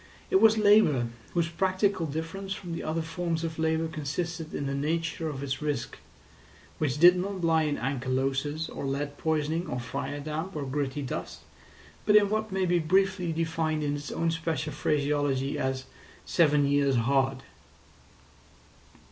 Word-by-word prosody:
It 380 - +5
was 220 0 +6
labour, 205 - +5 0.3
whose 170 -1 +2
practical 185 +1 0
difference 165 +6 -4
from 175 -3 -8
the 165 - -4
other 160 +1 -2
forms 165 0 -2
of 160 -1 -4
labour 160 0 +1
consisted 160 +2 -4
in 140 - -3
the 140 - -2
nature 160 +3 -1
of 140 -2 -5
its 135 0 -3
risk, 145 -5 -3 0.8
which 145 -3 0
did 175 +2 +8
not 190 0 -3
lie 160 -1 +3
in 145 -1 -1
ankylosis, 135 +4 -1
or - - -7
lead 140 +1 -3
poisoning, 160 +2 0
or 125 - -3
fire 140 +3 -4
damp, 155 +6 -4
or 150 - -2
gritty 140 +1 -2
dust, 130 - -5 0.7
but 210 - +5
in 205 -1 +6
what 215 -1 -1
may 190 0 +1
be 175 -1 +2
briefly 185 +1 +2
defined 160 -1 -1
in 145 0 0
its 145 0 -6
own 165 0 0
special 160 -3 -2
phraseology 145 -2 0
as 130 0 -1 0.4
"Seven 150 -4 +3
years 140 -1 +2
hard." 135 +2 +1
155 Hz, 155 wpm, -28 LUFS, 140-170 Hz, 0.8 s, did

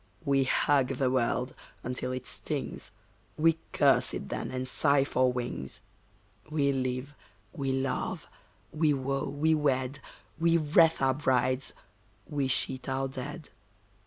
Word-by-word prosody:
We 135 -1 +3
hug 135 0 +3
the 130 -1 +1
world 125 0 0 0.3
until 125 +1 -3
it 130 0 -4
stings, - - -4 0.5
We 165 +1 +3
curse - - +3
it - - -6
then - - -3
and 130 0 -3
sigh 140 +1 +3
for 130 -2 +2
wings. 120 - -4 0.7
We 145 -3 +2
live, 130 +1 -2 0.4
we 135 -1 -2
love, 135 0 -2 0.5
we 155 -1 +2
woo, 135 +1 -2
we 155 +3 +2
wed, 135 -2 0 0.4
We 170 0 +4
wreathe 160 +1 +4
our 130 0 +4
brides, 130 -1 +1 0.5
we 140 -2 -1
sheet 130 0 0
our 135 0 0
dead. 135 +4 -7
135 Hz, 130 wpm, -29 LUFS, 130-145 Hz, 0.7 s, We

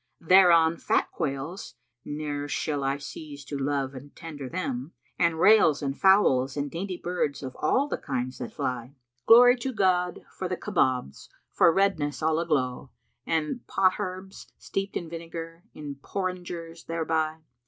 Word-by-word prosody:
Thereon 170 -2 +5
fat - - 0
quails 140 +7 -4 0.3
(ne'er 145 -1 -4
shall 145 -1 -2
I 135 +1 0
cease 145 0 -9
to 145 - -6
love 140 -1 -1
and 140 +2 -11
tender 150 -6 -8
them) 140 -4 -4
* - - -39
And 170 -2 +2
rails 165 -8 +5
and 135 -1 -2
fowls 145 -10 +4
and 145 -1 -2
dainty 180 +2 -4
birds 175 -6 -2
of 130 -1 -6
all 265 - +2
the - - -3
kinds 130 -2 -4
that - - -5
fly. 125 +1 -4 0.3
Glory 245 +2 +8
to 260 +2 -3
God 180 -5 +1
for - - -5
the - - -3
Kabobs, 125 - -1 0.2
for - - +5
redness 165 -6 0
all 160 0 +2
aglow, 135 -6 -1 0.2
* 120 - -46
And 160 +8 -1
potherbs, 185 0 -1
steeped 195 0 -3
in 170 - -6
vinegar, 165 +1 -8
in 145 -2 -7
porringers 175 -3 -5
thereby! 160 -1 -1
160 Hz, 155 wpm, -27 LUFS, 140-180 Hz, 0.3 s, Glory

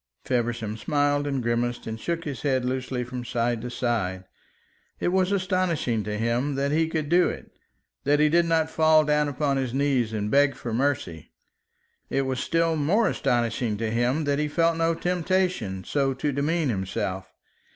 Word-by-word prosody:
Feversham 120 -3 -1
smiled 145 +4 +1
and 135 -3 -1
grimaced, 120 +1 -1
and 110 0 -5
shook 170 +5 -2
his 140 -5 -5
head 130 -3 +1
loosely 130 0 -2
from 125 0 -6
side 120 -1 -1
to 125 - -5
side. 110 -7 -2 0.8
It - - 0
was 185 +1 +2
astonishing 180 - 0
to 105 0 -3
him 120 +5 0
that 140 +1 0
he 160 +1 +2
could 155 -2 -2
do 175 +3 +4
it, - - -8 0.5
that 145 +1 +3
he 150 - +5
did 170 +3 +3
not 160 -1 +1
fall 155 -1 +5
down 150 0 +2
upon 140 0 0
his 130 -2 -2
knees 135 -5 +1
and 105 -1 -2
beg 140 0 +4
for 115 - -5
mercy. 115 - -1 0.8
It 135 - +1
was 130 -1 -2
still 165 +3 +1
more 170 +10 +2
astonishing 115 -2 0
to 110 0 -2
him 120 +6 +1
that 145 0 0
he 150 - +1
felt 165 +2 +2
no 165 0 +1
temptation 180 - -1
so 135 +2 0
to 145 +3 -1
demean 150 +2 0
himself. 95 -2 -3
135 Hz, 175 wpm, -25 LUFS, 120-160 Hz, 0.8 s, he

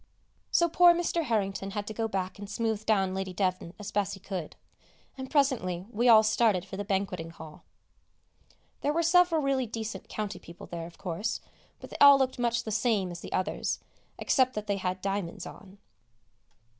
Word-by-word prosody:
So 340 - +3
poor 345 +1 +6
Mr. 340 -1 0
Harrington 195 -4 -1
had 205 - -2
to 215 - -6
go 225 +1 -1
back 190 -2 -3
and 205 -1 -8
smooth 220 0 -2
down 195 -4 +2
Lady 190 -1 -3
Devnant 185 -2 -1
as 210 -1 -7
best 205 -1 0
he - - -13
could; 185 -4 -6 0.6
and 265 -1 -7
presently 230 - +1
we 240 +3 +2
all 220 -1 +8
started 215 -4 +2
for 190 - -8
the 205 - -3
banqueting 190 -4 -2
hall. 160 -2 -12 1.2
There 290 - 0
were 335 +2 +1
several 335 -2 +4
really 270 -2 +1
decent 225 0 -6
county 210 -2 -4
people 170 +1 -12
there, 165 -1 -6
of 170 - -15
course, 200 +5 -3 0.4
but - - -11
they - - -6
all 280 -1 +10
looked 260 -2 0
much 235 -1 +1
the 220 - -5
same 215 -4 +1
as 175 - -7
the - - -9
others, 185 +2 -1 0.4
except 255 -2 +2
that 210 0 -3
they 200 -1 -1
had 185 -1 -3
diamonds 195 -3 -3
on. 195 0 -12
205 Hz, 185 wpm, -29 LUFS, 190-245 Hz, 1.2 s, all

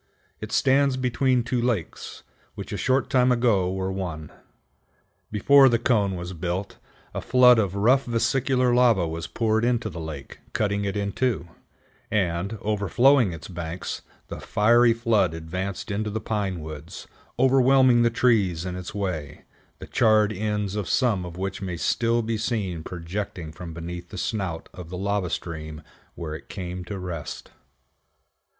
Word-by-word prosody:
It 110 0 -7
stands 135 +1 +3
between 125 0 +1
two 120 0 -1
lakes, 115 -9 -3 0.3
which - - -7
a - - -1
short 130 +1 +1
time 125 -1 +3
ago 115 -7 +2
were 95 0 -2
one. 85 -5 -5 1.0
Before 135 +6 +6
the 120 - +3
cone 105 -5 +1
was 90 +1 -6
built, 90 +3 -4 0.3
a - - -3
flood 125 -2 +6
of 100 -3 0
rough 125 +7 +3
vesicular 125 +2 +1
lava 120 -8 +4
was 80 0 -5
poured 110 +3 0
into 120 -3 0
the 85 - -7
lake, 80 -4 -8
cutting 100 -1 0
it 100 +1 -2
in 100 0 -1
two, 115 -8 -1 0.6
and, 95 +1 -1
overflowing 110 +3 +3
its 80 -1 -8
banks, 85 0 -5 0.3
the - - -7
fiery 120 +3 +4
flood 115 -8 +1
advanced 90 +6 -5
into 105 +2 -2
the 110 +1 -3
pine 100 -6 -2
woods, 75 -1 -9 0.3
overwhelming 130 -1 +5
the 120 - +4
trees 105 -8 +2
in 90 -1 -4
its 90 +3 -7
way, 90 -8 -4 0.3
the - - -9
charred 110 -2 +3
ends 105 -1 -2
of 105 -4 -3
some 110 -9 +1
of 85 0 -8
which 95 +2 -4
may 90 -3 -4
still 115 +6 +1
be 110 0 -2
seen 105 -7 -2
projecting 90 -1 -5
from 85 +1 -8
beneath 85 +2 -7
the - - -8
snout 95 -7 -3
of 90 -3 -9
the 90 - -6
lava 100 -1 -1
stream 80 -2 -5 0.3
where 80 -3 -5
it 80 - -9
came 90 -2 -5
to 100 +2 -5
rest. 90 -4 -6
100 Hz, 155 wpm, -25 LUFS, 90-120 Hz, 1.0 s, Before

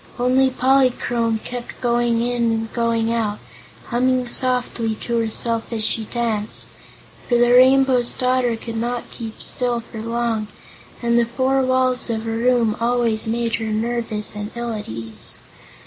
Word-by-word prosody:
Only 255 +2 +3
Polychrome 255 -3 +2
kept 245 -1 -7
going 240 -1 +1
in 240 -1 +1
and 225 0 -2
coming 230 -1 +1
out, 215 -3 -1 0.5
humming 255 +1 +2
softly 245 -2 +1
to 235 -1 0
herself 230 +1 -1
as 225 -2 -2
she 220 0 -1
danced, 220 -2 -2 0.6
for 245 - +3
the 240 0 +4
Rainbow's 255 -1 +5
Daughter 255 -2 +1
could 225 0 -6
not 240 +1 -3
keep 225 -2 -8
still 245 -2 -1
for 225 -1 -9
long, 230 -1 -1 0.6
and 235 0 +3
the 235 - +3
four 260 +3 +1
walls 255 -1 +1
of 225 -1 -2
a 225 - -2
room 230 -1 +2
always 230 -2 +1
made 230 0 0
her 225 - -4
nervous 220 -1 -1
and 210 0 -4
ill 235 -1 -3
at 210 -1 -6
ease. 110 0 -3
235 Hz, 150 wpm, -21 LUFS, 225-250 Hz, 0.6 s, Rainbow's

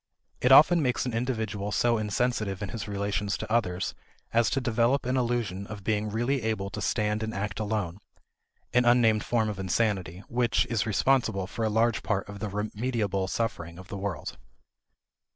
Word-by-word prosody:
It 125 - +3
often 160 +5 +8
makes 125 -3 0
an 125 - -3
individual 110 -4 -2
so 120 +1 +2
insensitive 105 -2 -1
in 100 - -4
his 115 -2 -5
relations 100 -1 -1
to - - -6
others 90 -6 0 0.4
as 115 -2 +4
to 135 - 0
develop 120 +2 +1
an 125 +1 0
illusion 115 -6 -1
of 105 -2 -8
being 105 0 0
really 120 +5 0
able 105 -3 -2
to - - -5
stand 105 0 0
and 110 0 -3
act 100 0 -3
alone 105 -4 -2 0.7
an 125 0 +5
unnamed 120 -3 +4
form 115 -2 +1
of 105 -2 -4
insanity 95 -2 -1
which 120 -1 +1
is 110 -3 0
responsible 110 -3 +2
for 115 +4 -4
a 110 - +2
large 115 +2 +2
part 100 -2 -1
of 100 0 -8
the 105 - -3
remediable 105 -1 -2
suffering 85 -8 -3
of 95 0 -12
the 100 - -5
world. 100 -2 -4
110 Hz, 175 wpm, -28 LUFS, 100-120 Hz, 0.7 s, often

